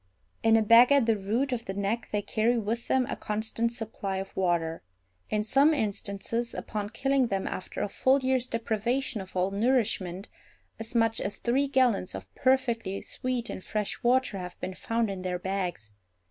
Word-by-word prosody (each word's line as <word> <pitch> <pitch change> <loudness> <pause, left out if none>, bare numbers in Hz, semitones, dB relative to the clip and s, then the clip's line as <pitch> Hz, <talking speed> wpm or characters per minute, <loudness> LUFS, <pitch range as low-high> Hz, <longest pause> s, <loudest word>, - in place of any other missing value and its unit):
In 225 0 +5
a 220 - +3
bag 230 +4 +7
at 280 -4 +5
the 225 -1 +3
root 220 +7 -1
of 235 -2 -2
the 195 - -4
neck 200 +4 -2
they 205 -1 0
carry 230 +4 +1
with 230 +2 -2
them 260 -1 +2
a - - -4
constant 220 +2 -2
supply 210 -4 -4
of 195 0 -6
water. 170 -3 0 0.5
In 210 0 0
some 280 +8 +4
instances, 220 +1 -2
upon 210 -2 -4
killing 270 +2 +1
them 195 -3 -1
after 185 - -5
a - - 0
full 260 +6 +3
year's 260 -1 +1
deprivation 230 +1 -1
of 190 0 -11
all 185 +1 +1
nourishment, 200 -4 0 0.5
as 225 +2 -7
much 225 -1 +2
as 200 - -3
three 265 +4 +1
gallons 250 - +2
of 95 0 -9
perfectly 235 - +1
sweet 250 -2 -2
and 185 - -6
fresh 210 -2 -2
water 245 -4 +2
have 180 -1 -8
been 185 - -4
found 230 +2 -1
in 190 -1 -5
their 180 -1 -2
bags. 180 - -3
220 Hz, 180 wpm, -28 LUFS, 195-240 Hz, 0.5 s, bag